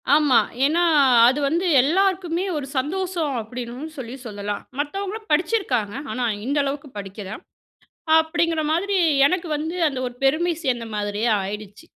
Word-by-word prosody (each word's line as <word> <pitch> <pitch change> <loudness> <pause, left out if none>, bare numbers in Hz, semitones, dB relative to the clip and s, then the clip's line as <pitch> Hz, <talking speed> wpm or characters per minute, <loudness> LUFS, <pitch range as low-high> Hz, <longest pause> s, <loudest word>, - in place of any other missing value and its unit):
ஆமா. 295 -5 +4 0.3
ஏனா 330 +5 +2 0.4
அது 265 +4 +2
வந்து 340 +4 0 0.2
எல்லாருக்குமே 365 +2 +1
ஒரு 290 - -4
சந்தோஷம் 335 +1 -1
அப்டின்னு 245 +6 -7
சொல்லி 250 -1 -6
சொல்லலாம். 205 -2 -4 0.2
மத்தவங்களும் 400 +8 -4
படிச்சிருக்காங்க. 295 - +1 0.2
ஆனா, 250 - -2 0.2
இந்த 285 +3 -1
அளவுக்கு 280 +1 -4
படிக்கில, 195 0 -7 0.9
அப்டிங்கிற 325 0 +1
மாதிரி 395 +5 0 0.3
எனக்கு 345 +2 -1
வந்து 320 +4 -4
அந்த 275 -3 -5
ஒரு 245 - -6
பெருமை 325 +6 +2
சேர்ந்த 240 -4 -1
மாதிரியே 210 +2 -1
ஆயிடுச்சு. 210 +6 -7
290 Hz, 130 wpm, -22 LUFS, 240-345 Hz, 0.9 s, ஆமா